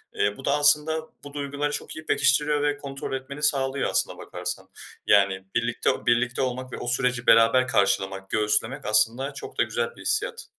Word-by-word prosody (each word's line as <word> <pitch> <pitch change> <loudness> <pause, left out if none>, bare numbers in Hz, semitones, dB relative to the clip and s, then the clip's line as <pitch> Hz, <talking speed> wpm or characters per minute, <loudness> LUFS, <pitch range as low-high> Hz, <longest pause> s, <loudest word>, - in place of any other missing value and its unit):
Eee, 100 0 0
bu 135 - -9
da 140 - +2
aslında 150 +2 +3 0.2
bu 145 - -10
duyguları 145 0 -3
çok - - -5
iyi 155 0 -9
pekiştiriyor 145 +2 +2
ve 145 0 +1
kontrol 135 -2 -6
etmeni 140 +3 -6
sağlıyor 135 -2 +1
aslına - - -1
bakarsan. - - -6 0.4
Yani 100 -1 +3
birlikte 120 0 0
o - - -2
birlikte 120 +2 +1
olmak 130 0 -3
ve - - -4
o 120 - -6
süreci 125 -1 0
beraber 115 +3 +5
karşılamak, 95 -2 0
göğüslemek 110 +6 0
aslında 115 +6 +1
çok 140 - -9
da - - +4
güzel 475 0 -3
bir - - -13
hissiyat. 435 +2 -1
135 Hz, 180 wpm, -25 LUFS, 115-145 Hz, 0.4 s, beraber